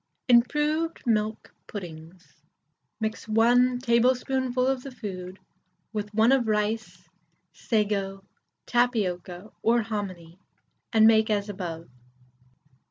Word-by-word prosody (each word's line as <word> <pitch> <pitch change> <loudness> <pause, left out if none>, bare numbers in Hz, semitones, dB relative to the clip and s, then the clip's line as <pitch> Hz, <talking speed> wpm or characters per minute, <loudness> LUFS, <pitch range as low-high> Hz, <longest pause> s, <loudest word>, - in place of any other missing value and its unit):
IMPROVED 300 +7 +2
MILK 215 -2 -1
PUDDINGS. 175 -2 -10 0.6
Mix 220 0 -4
1 245 +3 +4
tablespoonful 255 +1 +1
of 265 -1 0
the 275 - -8
food 190 -7 -7 0.6
with 210 -1 -4
1 225 +3 +5
of 260 -4 +3
rice, 215 +1 -2 0.5
sago, 200 -3 -1 0.4
tapioca, 210 -6 -1
or 235 0 +3
hominy, 185 -6 -6 0.5
and 220 -1 +5
make 220 0 +5
as 205 -1 0
above. 170 -4 -6
220 Hz, 100 wpm, -26 LUFS, 195-245 Hz, 0.6 s, 1